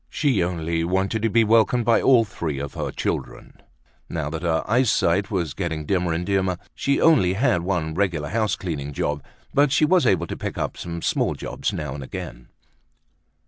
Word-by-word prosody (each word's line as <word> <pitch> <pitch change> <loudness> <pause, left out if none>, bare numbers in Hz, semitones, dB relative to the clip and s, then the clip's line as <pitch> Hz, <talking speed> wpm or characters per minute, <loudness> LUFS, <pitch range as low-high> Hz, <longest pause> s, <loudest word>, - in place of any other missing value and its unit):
She 135 - +1
only 85 -1 -1
wanted 95 +5 0
to 115 - +1
be 115 +2 +4
welcomed 115 +2 +3
by 115 0 +4
all 120 -4 +5
three 85 -8 -4
of 70 +1 -5
her - - -3
children. - - -5 0.5
Now 75 -3 -3
that 80 -1 -4
her 80 -2 0
eyesight 105 -5 +2
was 85 -8 -2
getting 80 -3 -3
dimmer 90 0 0
and 85 +2 -2
dimmer 95 -2 0 0.2
she 140 - 0
only 125 - +4
had 110 -4 +2
one 85 -3 -1
regular 85 -5 -1
house 110 +1 0
cleaning 75 -6 -5
job 75 +1 -2 0.3
but 145 0 +4
she 155 - +4
was 180 +2 +3
able 85 -2 +2
to - - -5
pick - - -5
up - - -2
some 85 -1 -6
small - - 0
jobs - - -3
now 65 - -4
and 70 -1 -6
again. 60 -1 -8
90 Hz, 185 wpm, -23 LUFS, 80-110 Hz, 0.5 s, all